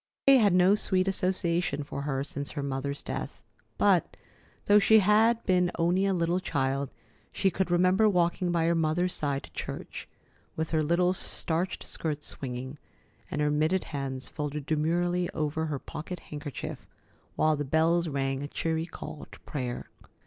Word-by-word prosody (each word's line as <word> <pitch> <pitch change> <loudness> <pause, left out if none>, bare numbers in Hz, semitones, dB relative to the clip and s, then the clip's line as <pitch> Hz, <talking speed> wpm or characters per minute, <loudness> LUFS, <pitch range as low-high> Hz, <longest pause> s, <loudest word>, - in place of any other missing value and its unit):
That 275 - +8
day - - +8
had 205 -5 +4
no 180 +2 +6
sweet 190 -2 +1
association 180 -5 0
for 140 0 -5
her 135 -1 -1
since 140 0 -5
her 145 - -3
mother's 140 +1 -3
death, - - -5 0.3
but, - - +3 0.5
though 205 0 +6
she 220 +2 +6
had 220 +3 +4
been 180 -2 +3
only 180 +4 +2
a 195 - +2
little 170 +1 +1
child, 140 -5 -1 0.4
she 190 -1 +1
could 190 +1 -1
remember 185 +5 +4
walking 175 -1 +1
by 170 -1 +1
her 170 - +3
mother's 165 +2 +1
side 140 -2 -2
to - - -12
church, - - -6 0.5
with 160 0 -2
her 160 -1 +2
little 175 +4 +2
starched 175 0 -2
skirts 150 -2 -4
swinging, 130 +2 -6 0.5
and 150 - -2
her 150 0 +2
mitted 155 +5 +1
hands 135 -3 -4
folded 150 -1 -4
demurely 175 +3 +1
over 155 +1 -1
her 150 -2 -2
pocket 165 +6 -7
handkerchief, 145 -2 -6 0.5
while 155 0 +3
the 145 - -2
bells 165 +4 +2
rang 135 -2 -1
a 145 - -4
cheery 160 +2 -2
call 155 - -8
to - - -12
prayer. 125 -4 -5
160 Hz, 165 wpm, -28 LUFS, 145-180 Hz, 0.5 s, That